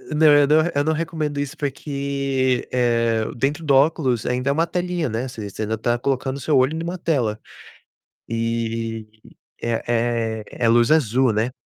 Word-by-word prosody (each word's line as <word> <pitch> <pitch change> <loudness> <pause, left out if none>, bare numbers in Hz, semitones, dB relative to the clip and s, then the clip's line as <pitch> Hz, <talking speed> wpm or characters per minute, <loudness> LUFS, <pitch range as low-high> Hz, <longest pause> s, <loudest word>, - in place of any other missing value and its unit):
Não, 155 +1 +5
eu 145 -1 +5
não 150 - +4 0.2
eu 145 - +1
não 160 - +2
recomendo 155 -2 -3
isso 145 +2 -4
porque, 140 -3 -1
eh, 115 -2 +1
dentro 145 +6 -1
do 140 - +4
óculos 135 -5 +2
ainda 125 +2 -1
é 140 - +3
uma 165 +3 +2
telinha, 175 -3 -2
né. 115 +4 -3
Você 110 -5 -7
você 110 - -5
ainda 110 +1 -1
está 120 +2 0
colocando 130 +1 -1
o - - -7
seu 140 +1 +1
olho 130 +4 +2
em 165 - -4
uma 175 +2 -4
tela. 125 -11 -1 0.9
E 115 -1 -2 0.6
e - - -4 0.2
é 115 -2 0
é 120 - -1
luz 120 +3 +4
azul, 130 -5 +3
né. 110 +4 0
130 Hz, 180 wpm, -22 LUFS, 115-145 Hz, 0.9 s, Não